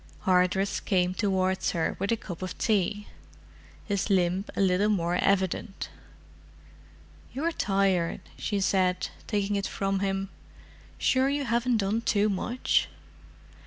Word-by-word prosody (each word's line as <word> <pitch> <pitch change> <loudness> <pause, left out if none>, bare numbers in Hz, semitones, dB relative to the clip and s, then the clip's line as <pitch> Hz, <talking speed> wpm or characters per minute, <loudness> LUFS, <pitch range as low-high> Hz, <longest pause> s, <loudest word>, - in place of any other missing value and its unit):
Hardress 185 +1 +2
came 180 -2 +1
towards 190 -2 0
her 165 -2 0
with 200 +3 -1
a 230 - +2
cup 180 -5 -8
of 185 - -5
tea, 205 -1 0 0.8
his 200 0 -1
limb 185 0 +2
a - - -3
little 195 +2 +3
more 175 -4 +1
evident. 195 +1 0 1.4
"You're 315 +6 -1
tired," 195 - +1
she 205 -2 -2
said, 185 -1 +1 0.2
taking 205 -1 0
it 200 - -1
from 195 0 -1
him. 195 0 -1 0.7
"Sure 260 +1 +2
you 285 0 -1
haven't 235 +1 +1
done 210 +2 0
too 210 -2 +2
much?" 235 +6 +1
195 Hz, 125 wpm, -28 LUFS, 185-210 Hz, 1.4 s, little